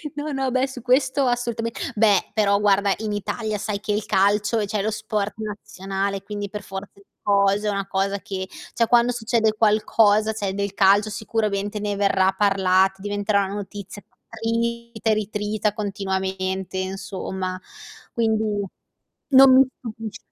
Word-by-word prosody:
No, 295 Hz, +1 st, -4 dB
no, 270 Hz, -2 st, -1 dB
beh, 260 Hz, +1 st, +1 dB
su 260 Hz, -2 st, -9 dB
questo 265 Hz, +2 st, +2 dB
assultame 235 Hz, -2 st, -1 dB, 0.2 s
beh, 210 Hz, -3 st, +3 dB
però 200 Hz, -2 st, +3 dB
guarda, 200 Hz, -1 st, +3 dB
in 215 Hz, -1 st, -3 dB
Italia 215 Hz, +1 st, -3 dB
sai 200 Hz, 0 st, -3 dB
che 210 Hz, 0 st, -2 dB
il 210 Hz, 0 st, -2 dB
calcio 205 Hz, +3 st, +2 dB
è 205 Hz, -, -1 dB
cioè 205 Hz, -1 st, -1 dB
lo 220 Hz, -, 0 dB
sport 215 Hz, -1 st, -2 dB
nazionale, 195 Hz, -2 st, -4 dB
quindi 205 Hz, -1 st, -5 dB
per 210 Hz, 0 st, -6 dB
forza 195 Hz, 0 st, -7 dB
di 200 Hz, -, -21 dB, 0.2 s
cose 200 Hz, +1 st, +2 dB
è -, -, +2 dB
una 195 Hz, -1 st, -3 dB
cosa 195 Hz, +1 st, -1 dB
che 190 Hz, -1 st, -5 dB, 0.3 s
cioè 230 Hz, -, +3 dB
quando 240 Hz, +1 st, +4 dB
succede 225 Hz, -2 st, +1 dB
qualcosa, 215 Hz, 0 st, +3 dB
cioè, 200 Hz, -3 st, -3 dB
del 200 Hz, 0 st, -3 dB
calcio 205 Hz, +2 st, +4 dB
sicuramente 210 Hz, -1 st, -2 dB
ne 205 Hz, -1 st, -2 dB
verrà 195 Hz, -1 st, +3 dB
parlat 190 Hz, -1 st, +3 dB
diventerà 205 Hz, 0 st, 0 dB
una 195 Hz, +2 st, -5 dB
notizia 205 Hz, 0 st, -8 dB, 0.3 s
trita 230 Hz, 0 st, -2 dB
e -, -, +5 dB
ritrita 210 Hz, 0 st, -1 dB
continuamente 190 Hz, -2 st, -3 dB
insomma. 185 Hz, -1 st, -4 dB, 0.5 s
Quindi 220 Hz, -1 st, +1 dB, 0.8 s
non 265 Hz, -1 st, +8 dB
mi 265 Hz, 0 st, +7 dB
stupisc 225 Hz, -2 st, -7 dB
205 Hz, 155 wpm, -23 LUFS, 195-220 Hz, 0.8 s, non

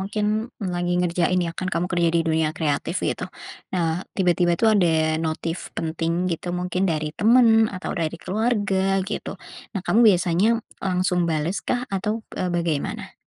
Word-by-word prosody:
mungkin 210 Hz, +3 st, -1 dB, 0.2 s
lagi 175 Hz, -1 st, -1 dB
ngerjain 180 Hz, +1 st, +1 dB
ya 170 Hz, -, -2 dB
kan 185 Hz, -, -2 dB
kamu 175 Hz, -1 st, 0 dB
kerja 175 Hz, -1 st, +2 dB
di 165 Hz, -, +4 dB
dunia 160 Hz, -1 st, +1 dB
kreatif 160 Hz, +3 st, -1 dB
gitu, -, -, -1 dB, 0.5 s
nah, 165 Hz, -1 st, 0 dB, 0.2 s
tiba-tiba 175 Hz, -2 st, +3 dB
itu -, -, -1 dB
ada 200 Hz, -5 st, +4 dB, 0.3 s
notif 165 Hz, +2 st, -2 dB, 0.2 s
penting 165 Hz, +2 st, -1 dB
gitu 175 Hz, +2 st, -4 dB
mungkin 180 Hz, +1 st, -2 dB
dari 155 Hz, -2 st, -1 dB
temen 225 Hz, 0 st, +5 dB
atau 185 Hz, -2 st, -5 dB
dari 165 Hz, -2 st, -2 dB
keluarga 195 Hz, -2 st, +1 dB
gitu. -, -, -4 dB, 0.4 s
Nah 195 Hz, -, -1 dB
kamu 225 Hz, -, +3 dB
biasanya 175 Hz, +3 st, +1 dB, 0.3 s
langsung 180 Hz, -2 st, +1 dB
bales 160 Hz, +5 st, -1 dB
kah 245 Hz, 0 st, 0 dB
atau, 210 Hz, +4 st, -1 dB, 0.2 s
eee, 185 Hz, -, 0 dB
bagaimana? 165 Hz, -4 st, -2 dB
180 Hz, 155 wpm, -23 LUFS, 170-195 Hz, 0.5 s, temen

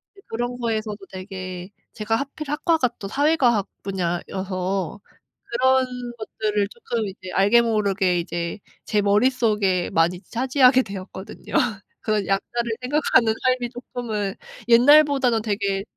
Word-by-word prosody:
네. 395 Hz, -, -17 dB
그런 240 Hz, +2 st, -3 dB
거에서도 220 Hz, -3 st, -2 dB
되게 185 Hz, -1 st, -7 dB, 0.2 s
제가 225 Hz, +1 st, -1 dB
하필 280 Hz, +3 st, -5 dB
학과가 300 Hz, -3 st, +2 dB
또 195 Hz, -, -5 dB
사회과학 255 Hz, -5 st, +2 dB, 0.2 s
분야여서 185 Hz, 0 st, -3 dB, 0.5 s
그런 260 Hz, +2 st, +3 dB, 0.3 s
것들을 210 Hz, -2 st, -1 dB
쪼끔 230 Hz, -1 st, -3 dB
이제 185 Hz, -1 st, -8 dB
알게 205 Hz, +5 st, +5 dB
모르게 200 Hz, -5 st, +1 dB
이제 170 Hz, +2 st, -4 dB, 0.3 s
제 210 Hz, -, +1 dB
머릿속에 205 Hz, -3 st, +2 dB
많이 170 Hz, +2 st, +2 dB
차지하게 255 Hz, +1 st, +3 dB
되었거든요. 190 Hz, -1 st, -9 dB, 0.5 s
그런 215 Hz, -3 st, 0 dB
약자를 230 Hz, +4 st, -1 dB
생각하는 255 Hz, -4 st, +3 dB
삶이 255 Hz, -1 st, +1 dB
쪼끔은 230 Hz, -5 st, -4 dB, 0.3 s
옛날보다는 260 Hz, -1 st, +5 dB
되게 200 Hz, -2 st, -1 dB
215 Hz, 295 characters per minute, -23 LUFS, 195-250 Hz, 0.5 s, 알게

